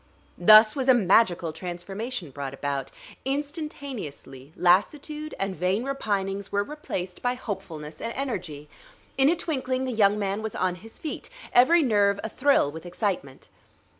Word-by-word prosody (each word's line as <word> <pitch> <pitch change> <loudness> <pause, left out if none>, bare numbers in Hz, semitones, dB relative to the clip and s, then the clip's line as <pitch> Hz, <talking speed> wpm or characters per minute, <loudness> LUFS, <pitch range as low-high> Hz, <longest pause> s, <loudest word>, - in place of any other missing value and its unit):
Thus 215 +4 +8
was 265 -2 -1
a 260 - +8
magical 185 -6 +3
transformation 180 - -5
brought 135 0 -5
about. 140 -1 -3 0.3
Instantaneously 270 - -5
lassitude 295 - +1
and 195 -1 -2
vain 185 +7 0
repinings 200 -7 -2
were 200 0 +1
replaced 190 -10 -6
by 245 0 0
hopefulness 170 -10 -7
and 230 - -3
energy. 180 - -4 0.5
In 270 +1 +4
a 340 - +3
twinkling 260 -6 -2
the 260 - -2
young 210 -3 +3
man 200 0 -1
was 220 -1 -5
on 185 -1 0
his 225 0 -11
feet, 310 - -6 0.2
every 305 +7 +6
nerve 205 -5 +3
a 220 - -3
thrill 270 - +3
with 160 +1 -9
excitement. 175 - -3
205 Hz, 145 wpm, -26 LUFS, 175-260 Hz, 0.5 s, Thus